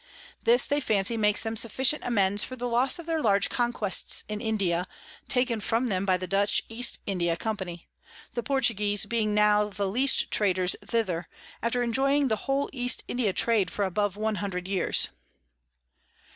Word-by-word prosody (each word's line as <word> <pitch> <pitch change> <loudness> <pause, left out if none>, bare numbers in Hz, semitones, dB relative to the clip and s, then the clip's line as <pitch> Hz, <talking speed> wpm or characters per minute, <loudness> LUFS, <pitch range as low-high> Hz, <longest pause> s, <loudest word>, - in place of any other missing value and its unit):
This 240 +3 +5
they 285 - 0
fancy 215 -4 0
makes 210 -2 +2
them 225 0 -3
sufficient 260 +6 +2
amends 205 -4 +1
for 255 - -6
the 245 0 -4
Loss 245 +7 +3
of 340 - -9
their 325 -1 -1
large 200 -4 +2
Conquests 240 -5 0
in 210 0 -5
India, 190 -5 -1 0.4
taken 250 -3 0
from 235 +4 0
them 190 0 -1
by 185 -1 +3
the 185 - -5
Dutch 200 +2 +1
East 240 +2 -1
India 175 -4 -1
Company; 190 -5 -5 0.5
the 240 - -2
Portuguese 210 -7 +1
being 215 -3 -1
now 210 0 +4
the 200 0 -3
least 255 +8 +2
Traders 185 -3 +2
thither, 195 -6 -2 0.3
after 245 +1 0
enjoying 270 +4 +1
the 220 +3 -3
whole 275 +1 +1
East 250 -2 0
India 240 -5 0
Trade 215 0 +1
for 205 - -2
above 205 +1 -1
one 215 0 -1
hundred 185 -3 -4
Years. 190 -2 +1
215 Hz, 165 wpm, -27 LUFS, 195-245 Hz, 0.5 s, This